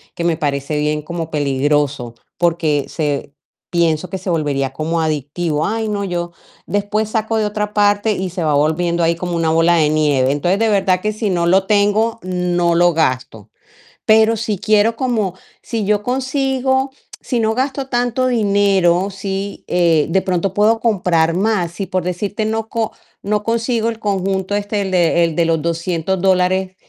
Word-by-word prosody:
que 170 - -4
me 170 -2 +1
parece 145 0 -2
bien 150 0 0
como 165 +1 -5
peligroso, 145 -3 0 0.2
porque 165 -4 +1
se 145 -2 -3 0.4
pienso 170 0 0
que 190 - -4
se 185 +1 -6
volvería 145 -5 0
como 160 +4 -2
adictivo. 155 +1 -1
Ay, 220 0 -2
no, 200 -1 -2
yo 175 -2 -3 0.4
después 205 +1 -1
saco 220 0 -1
de 220 - +1
otra 210 0 -3
parte, 205 +1 +2
y 190 -1 -3
se 175 -1 -3
va 150 - +2
volviendo 170 +4 +1
ahí 165 +1 +2
como 175 0 -3
una 165 -1 +1
bola 165 +2 +3
de 155 -3 +3
nieve. 145 -4 +2
Entonces, 175 +7 +1
de 225 0 +2
verdad 190 -3 +2
que 215 - 0
si 215 0 -2
no 170 -2 0
lo 190 +2 +3
tengo, 210 +2 +2
no 175 -1 0
lo 175 0 +4
gasto, 130 -8 -1 0.6
pero 220 +1 +5
si 215 -1 -2
quiero 215 +3 +2
como 225 -7 -1 0.3
si 225 -2 -3
yo 205 0 +1
consigo 265 +1 0 0.3
si 245 - -2
no 220 0 +1
gasto 270 +1 -2
tanto 245 0 0
dinero, 200 -5 +2
sí, 195 +1 -5
eh, 170 -4 +3
de 190 +3 +2
pronto 185 0 -1
puedo 215 +3 +3
comprar 180 -7 +1
más, 190 -2 0
si, 190 +2 -5
por 185 -1 -1
decirte, 200 +5 -2
no 220 0 -2
co 225 -2 -2 0.3
no 210 +1 0
consigo 230 +1 0
el 230 - -5
conjunto 195 -2 -1
este, 205 0 -1
el 190 -1 -3
de 170 -2 +3
el 165 -2 0
de 170 0 +2
los 165 -1 +1
$200 170 +2 -1
dólares, 185 0 +1
185 Hz, 175 wpm, -18 LUFS, 165-215 Hz, 0.6 s, pero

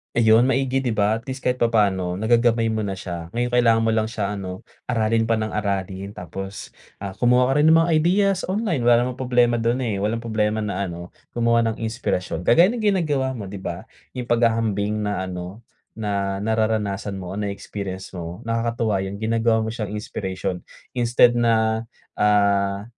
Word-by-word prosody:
Ayun, 115 0 +5
maigi, 135 0 +1
'di 125 - 0
ba? 105 0 +2
At 115 - -7
least 130 0 -6
kahit 125 -1 0
papaano, 100 -6 +1
nagagamay 115 0 +3
mo 110 -1 -1
na 95 -2 -4
siya. 85 -2 -6
Ngayon, 120 +3 -1
kailangan 120 -2 +3
mo 115 0 +1
lang 110 +1 0
siya 105 -3 -2
ano, 95 -1 -6 0.2
aralin 115 -1 +1
pa 115 0 +1
nang 110 0 -3
aralin. 100 -1 -2
Tapos, 95 +2 -7 0.3
ah, 95 -2 -6
kumuha 125 +1 +3
ka 135 - +2
rin 160 - +6
ng 165 - +6
mga 165 +1 +2
ideas 190 +4 +3
online. 185 - -1
Wala 120 +1 +4
namang 125 - -5
problema 125 -2 +2
dun, 120 +2 0
eh, 105 -6 -2
walang 110 +2 0
problema 110 -2 -1
na 100 -2 -2
ano, 85 -1 -7 0.2
gumawa 115 0 +2
ng 110 - -9
inspirasyon. 110 -7 -2
Kagaya 170 - +6
ng 225 - -4
ginagawa 155 -10 +1
mo, 110 -7 -6
'di 95 0 -8
ba, 90 +6 -5 0.2
yung 125 -2 -6
paghahambing 110 -3 +1
na 105 -3 -2
ano, 90 +4 -7 0.3
na 100 -2 -2
nararanasan 110 -2 -1
mo 95 -2 -6
o 100 - -4
na-experience 100 -2 -5
mo, 85 -1 -7
nakakatuwa 115 -3 0
yung 100 - -6
ginagawa 110 +1 +1
mo 110 - -3
siyang 105 -3 -4
inspiration 95 -3 -4 0.3
instead 120 0 +4
na, 110 -1 +1 0.3
ah, 100 -1 +2
110 Hz, 180 wpm, -22 LUFS, 100-120 Hz, 0.3 s, rin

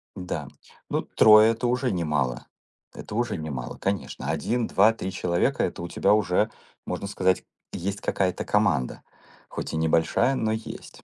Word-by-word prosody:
Да. 90 -1 -5 0.4
Ну, - - 0
3- 110 +1 +6
это 115 +2 -2
уже 125 0 0
немало. 75 -8 -1 0.5
Это 105 - -8
уже 120 -4 -1
немало, 75 -6 -5
конечно. 100 0 -3
1, 120 -1 -1
2, 105 +3 +5
3 95 -4 -5
человека- 85 -1 0
это - - -3
у 85 - -4
тебя 105 - +2
уже, 105 +1 +2 0.4
можно 100 - -4
сказать, 95 -2 +1 0.3
есть 100 +3 -4
какая-то 95 -2 -1
команда. 100 - +1 0.5
Хоть - - -6
и 80 - -1
небольшая, 80 +11 +2
но 110 -4 0
есть. 110 0 -7
100 Hz, 150 wpm, -25 LUFS, 85-110 Hz, 0.5 s, 3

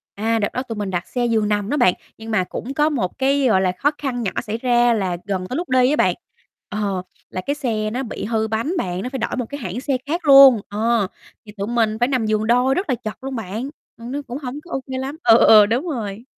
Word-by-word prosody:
À, 225 +2 0
đợt 205 - +1
đó 255 - -1
tụi 230 -3 -6
mình 205 -2 -3
đặt 175 -1 -3
xe 245 -1 -1
giường 225 -3 +1
nằm 205 0 -1
đó 295 - 0
bạn. 180 - +4 0.2
Nhưng 225 0 -8
mà 185 -4 +2
cũng 250 +8 -6
có 300 +2 +2
một 230 -12 -2
cái, 275 +1 +2
gọi 190 -5 +3
là, 185 -1 +2
khó 275 +11 0
khăn 255 -4 -3
nhỏ 195 - -1
xảy 215 +2 -4
ra 240 -1 +3
là 185 -5 -1
gần 190 -2 -3
tới 250 - -4
lúc 350 - -4
đi 255 0 +4
á 300 - +2
bạn, - - +2 0.5
ờ, 200 -3 -2 0.3
là 185 - -4
cái 285 - 0
xe 225 -7 -2
nó 255 +4 -2
bị 225 - -6
hư 220 0 0
bánh 225 +10 -2
bạn, 180 - -2
nó 250 - -4
phải 265 - -5
đổi 235 - -2
một 250 - -2
cái 285 0 -6
hãng 225 +2 -5
xe 275 -2 0
khác 330 +4 -3
luôn. 275 -5 +8
Ờ, 220 0 +1 0.4
thì 210 - -11
tụi 200 +1 -3
mình 225 -2 +1
phải 245 - +3
nằm 255 -5 0
giường 215 0 0
đôi 250 +3 +3
rất 370 -3 -2
là 255 - +2
chật 215 +3 -8
luôn 270 -1 -4
bạn, 225 +4 -4 0.3
ừm, 235 +1 -8
nó 285 +2 -3
cũng 245 - -5
hổng 275 0 -6
có 350 - -15
OK 270 - -3 0.2
lắm. 275 +4 -5
Ừ, 230 -1 +7
ừ, - - +5
ừ, 215 -2 +8
đúng 245 - -1
rồi. 225 -6 -5
235 Hz, 270 wpm, -21 LUFS, 210-265 Hz, 0.5 s, luôn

